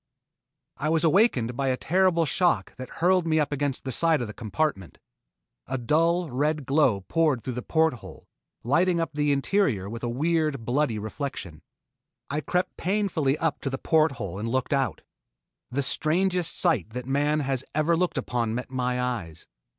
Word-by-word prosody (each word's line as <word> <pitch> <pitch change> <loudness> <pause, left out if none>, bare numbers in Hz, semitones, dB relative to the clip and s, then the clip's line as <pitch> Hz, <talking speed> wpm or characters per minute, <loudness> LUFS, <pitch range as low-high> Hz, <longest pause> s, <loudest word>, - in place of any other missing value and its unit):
I 155 - -1
was 160 0 +2
awakened 155 - +3
by 135 +1 -1
a 130 -1 +1
terrible 180 0 +2
shock 145 - +1
that 130 0 -7
hurled 180 0 +2
me 160 -1 +2
up 150 -1 0
against 145 -2 -2
the 130 - -4
side 165 +4 +2
of 120 - -2
the 105 - -8
compartment. 110 - -2 0.7
A 135 - -2
dull, 165 +6 +1
red 150 +3 0
glow 130 -7 +2
poured 150 - +1
through 130 - -4
the 125 - -4
port 160 +2 +2
hole, 120 - -12 0.4
lighting 170 +7 +2
up 165 - -1
the 145 0 +1
interior 140 - +1
with 115 +3 -6
a 120 - -2
weird, 150 -1 0
bloody 125 -2 +1
reflection. 105 - -6 0.7
I 150 +2 -1
crept 180 +3 -1
painfully 175 -8 0
up 160 -1 -1
to 135 - -2
the 135 - -3
port 155 0 +2
hole 100 -6 -6
and 115 +2 -3
looked 130 +4 -1
out. 135 -1 -1 0.7
The 135 +3 -1
strangest 175 +5 0
sight 125 - +2
that 125 0 -5
man 145 +3 +1
has 135 -2 -1
ever 155 +2 +2
looked 180 +1 0
upon 115 -2 -1
met 125 +1 -5
my 125 -1 -1
eyes. 110 -11 -4
140 Hz, 175 wpm, -26 LUFS, 125-165 Hz, 0.7 s, awakened